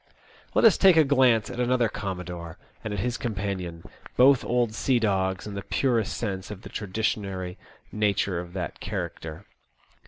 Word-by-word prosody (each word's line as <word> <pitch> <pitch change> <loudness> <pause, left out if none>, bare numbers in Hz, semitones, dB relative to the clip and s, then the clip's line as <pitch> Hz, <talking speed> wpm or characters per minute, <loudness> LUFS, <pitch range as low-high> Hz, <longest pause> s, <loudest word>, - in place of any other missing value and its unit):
Let - - +5
us 220 - +6
take 190 -4 +7
a 160 - +8
glance 130 -6 +4
at 125 - -6
another 125 -1 +2
commodore, 90 -5 -6 0.3
and 110 - -4
at 100 -2 -2
his 120 +1 -1
companion, 95 -7 -3 0.3
both 130 +1 +6
old 120 -2 +1
sea 125 +3 +1
dogs 95 -4 0
in 105 - -6
the 100 - -4
purest 115 -2 0
sense 95 -5 -3
of 105 -2 -8
the - - -9
traditionary 95 -3 -3 0.3
nature 100 -4 +1
of 90 0 -8
that 90 -2 -4
character. 80 -1 -5
105 Hz, 160 wpm, -26 LUFS, 95-120 Hz, 0.3 s, a